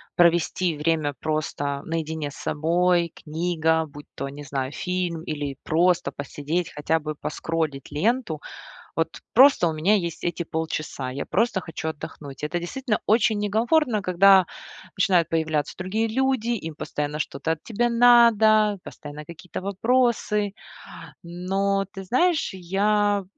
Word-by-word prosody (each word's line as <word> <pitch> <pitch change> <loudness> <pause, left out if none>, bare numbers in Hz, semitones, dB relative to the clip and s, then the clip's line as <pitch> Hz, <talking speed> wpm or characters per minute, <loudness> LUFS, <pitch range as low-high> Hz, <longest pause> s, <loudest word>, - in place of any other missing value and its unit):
провести 175 0 +3
время 150 -2 0
просто 145 -2 -2
наедине 160 -2 -3
с - - -13
собой: 170 +2 +1
книга, 160 0 0
будь 145 0 -12
то, 140 - -4
не 145 +1 -9
знаю, 135 -1 -3
фильм 180 -2 -3
или 145 -4 -4
просто 175 +2 +2
посидеть, 150 +4 -3
хотя 155 +2 0
бы 155 0 -5
поскроллить 155 -2 -3
ленту. 185 - 0 0.6
Вот 165 0 -2
просто 265 -7 +6
у 165 - +1
меня 160 +7 +2
есть 170 -4 -3
эти 175 0 -2
полчаса. 155 -5 -4
Я 140 +2 -5
просто 220 -1 +1
хочу 160 -2 -5
отдохнуть. 150 -2 -7
Это 175 +3 -2
действительно 230 +5 -2
очень 220 -1 +3
некомфортно, 220 +2 +2
когда 190 0 +5 0.5
начинают 180 -3 +3
появляться 155 -2 -1
другие 205 +5 -1
люди, 260 0 0
им 165 -10 -3
постоянно 150 0 -3
что-то 150 +2 -2
от 160 - -6
тебя 240 +1 0
надо, 225 -3 +5
постоянно 150 +1 -9
какие-то 170 +3 -8
вопросы. 210 -1 +1 0.7
Но 195 +3 -1
ты 195 - -7
знаешь, 315 - +2
я 200 +2 +1
170 Hz, 135 wpm, -24 LUFS, 155-205 Hz, 0.7 s, просто